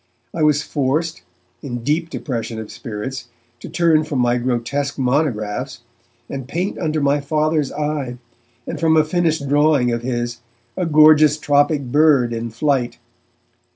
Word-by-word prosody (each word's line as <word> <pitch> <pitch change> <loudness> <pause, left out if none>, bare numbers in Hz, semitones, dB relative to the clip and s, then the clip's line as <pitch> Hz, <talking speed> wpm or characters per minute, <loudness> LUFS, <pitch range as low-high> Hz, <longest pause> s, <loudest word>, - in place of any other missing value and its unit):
I 165 - -3
was 150 -1 +3
forced, 155 +4 -1 0.4
in 120 -4 -6
deep 160 +5 0
depression 120 -8 -4
of 110 - -8
spirits, 120 +3 -6 0.3
to - - -9
turn 165 -3 +3
from 150 -2 -4
my 120 0 +2
grotesque 130 +4 -2
monographs, 125 -2 -1 0.5
and 135 -2 -6
paint 175 +7 -3
under 155 -1 -1
my 145 0 +2
Father's 155 0 0
eye, 145 -4 -3 0.5
and, - - -5
from 160 -1 +3
a 155 - +5
finished 160 -2 0
drawing 145 -3 +3
of 115 0 -2
his, 120 -1 -3 0.4
a 180 - -1
gorgeous 155 -1 +6
tropic 145 0 +2
bird 135 -2 +3
in 115 0 -4
flight. 125 +1 -1
145 Hz, 145 wpm, -20 LUFS, 120-155 Hz, 0.5 s, gorgeous